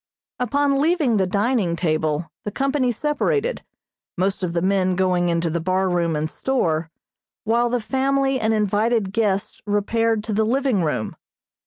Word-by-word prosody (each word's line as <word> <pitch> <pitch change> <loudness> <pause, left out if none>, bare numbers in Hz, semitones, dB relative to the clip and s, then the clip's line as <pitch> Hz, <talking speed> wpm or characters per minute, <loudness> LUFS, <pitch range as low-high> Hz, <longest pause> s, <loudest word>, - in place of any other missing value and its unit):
Upon 280 +3 +1
leaving 305 -8 +2
the 190 -2 +1
dining 205 -2 +1
table, 155 -1 -1
the - - -3
company 270 +2 0
separated, 420 - -1 0.5
most 195 +3 0
of 170 -2 -1
the 170 - 0
men 185 -1 +2
going 180 -1 +1
into 170 0 0
the 170 +1 -1
bar 185 +2 +1
room 170 -2 0
and 150 +1 -1
store, 165 -7 -1 0.5
while 235 +2 +2
the 245 +1 0
family 270 +2 0
and 220 -1 +1
invited 210 0 +1
guests 200 -3 -1
repaired 220 +2 +1
to 215 - -3
the 220 +2 +2
living 245 -4 +1
room. 125 -8 -2
210 Hz, 155 wpm, -22 LUFS, 180-250 Hz, 0.5 s, leaving